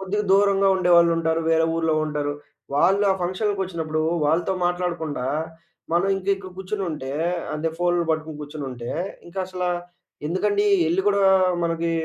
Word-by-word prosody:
కొద్దిగా 205 +2 -2
దూరంగా 195 0 +4
ఉండేవాళ్ళు 170 -2 +5
ఉంటారు. 160 0 0
వేరే 160 0 +4
ఊర్లో 160 -1 +1
ఉంటారు. 145 -1 -2 0.4
వాళ్ళు 195 +7 +3
ఆ - - -1
ఫంక్షన్‌లకి 195 +2 -1
ఒచ్చినప్పుడు 160 -4 -3 0.2
వాళ్ళతో 165 +5 +1
మాట్లాడకుండా, 170 -7 -2 0.7
మనం 185 +3 +2
ఇంకా 195 +1 -2
ఇక్కడ 190 -1 -10
కూర్చొనుంటే, 180 -9 -4 0.4
అంటే 160 +1 -1
ఫోనులు 175 -1 +1
పట్టుకొని 155 -1 -5
కూర్చొనుంటే, 135 -5 -6 0.4
ఇంకా 190 +2 -4
అసల 185 -1 -4 0.6
ఎందుకండీ 205 +3 +1 0.2
ఎళ్లి 175 +4 +2
గూడా 200 -1 +2 0.4
మనకి 165 0 -1
175 Hz, 135 wpm, -23 LUFS, 160-190 Hz, 0.7 s, ఉండేవాళ్ళు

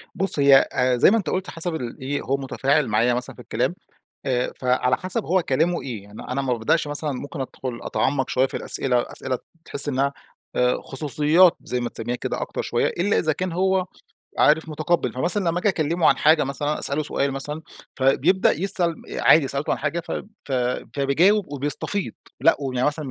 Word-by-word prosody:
بُص 190 -5 -2
هي 140 -1 +7 0.2
آآ 125 -1 +2
زي 125 - +6
ما 230 - +4
أنت 180 -8 -2
قلت 185 +1 -2
حسب 165 0 -3
ال 125 -6 -6
إيه 140 +2 -2
هو 135 +1 -1
متفاعل 135 +1 0
معايا 115 +3 +2
مثلًا 125 +1 -4
في - - -12
الكلام 120 +7 -1 0.5
آآ، 125 -2 0
فعلى 125 0 +2
حسب 195 +4 -3
هو 185 +1 +2
كلامه 165 +6 0
إيه، 115 -7 -6
يعني 105 +1 -11
أنا 135 +2 -3
ما 130 -2 -1
بابدأش 120 +7 +1
مثلًا 145 0 -2
ممكن 140 +3 -6
أدخل 130 -2 -5
أتعمق 135 -1 0
شوية 130 +1 +2
في - - -6
الأسئلة، 125 -2 +1
أسئلة 130 -1 -3 0.3
تحس 140 - +3
إنها 140 0 0 0.7
خصوصيات 150 +5 +3
زي 125 - -3
ما 120 - -2
تسميها 120 +1 -4
كده - - -4
أكتر - - -4
شوية، - - 0
إلا 195 +4 0
إذا 155 - +1
كان 180 +3 -3
هو 190 +1 +1 0.5
عارف 160 +2 +4
متقبل. 155 -4 0
فمثلًا 175 +8 +1
لمّا 170 +1 0
آجي 205 - +2
أكلمه 165 -1 +1
عن - - +4
حاجة 155 0 +4
مثلًا 145 +2 -2
أسأله 145 +2 +1
سؤال 140 -1 -1
مثلًا، 150 +3 -4 0.3
فبيبدأ 140 +8 +3
يسأل 175 0 -1 0.2
عادي 150 -4 +5
سألته 140 +2 -2
عن - - -1
حاجة 155 +3 -2
ف - - -8 0.3
ف 140 - -7 0.4
فبيجاوب 160 +6 +2
وبيستفيض 145 +8 -2 0.3
لأ، 165 - +5
ويعني 130 -1 -1
مثلًا 150 -2 -2
145 Hz, 185 wpm, -23 LUFS, 130-170 Hz, 0.7 s, هي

